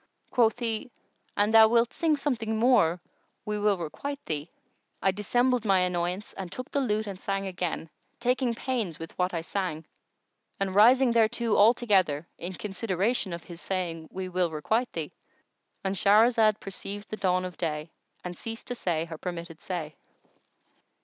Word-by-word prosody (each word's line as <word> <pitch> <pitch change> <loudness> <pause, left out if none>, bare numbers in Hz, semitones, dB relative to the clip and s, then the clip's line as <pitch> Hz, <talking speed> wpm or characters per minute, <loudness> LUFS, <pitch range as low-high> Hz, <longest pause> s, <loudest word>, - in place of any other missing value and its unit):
Quoth 235 -2 +3
he, 230 0 -3 0.5
"An 205 +1 +3
thou 220 0 +8
wilt 235 +2 +2
sing 315 -3 +2
something 230 -6 -1
more 220 -8 +4 0.5
we 210 -1 -2
will 205 -1 +2
requite 275 - -5
thee." 150 +1 -3 0.5
I 195 - +3
dissembled 245 +5 +1
my 195 -4 +4
annoyance 180 +2 -1
and 185 -3 -7
took 255 +6 -7
the 280 - +1
lute 215 -4 0
and 195 -2 -7
sang 195 0 -2
again, 180 -3 -3 0.3
taking 250 -1 +1
pains 230 -10 -2
with 165 0 -9
what 180 +1 +2
I 170 - -2
sang 165 -3 -3 0.7
and 195 -1 -1
rising 245 +5 +6
thereto 230 0 +2
altogether, 200 -8 +3
in 175 +2 -5
consideration 200 +1 -1
of 170 -1 -5
his 170 -1 -9
saying, 170 -4 -3
"We 185 0 -4
will 180 -1 0
requite 220 +11 0
thee."——And 170 +4 -8
Shahrazad 215 +2 +4
perceived 200 +1 -6
the 215 - -3
dawn 185 -2 +1
of 180 -2 -6
day 155 -1 -3 0.3
and 180 0 -5
ceased 225 +5 -6
to - - -1
say 170 -8 -1
her 160 -2 -8
permitted 170 -2 -6
say. 165 -5 -4
195 Hz, 155 wpm, -28 LUFS, 175-230 Hz, 0.7 s, thou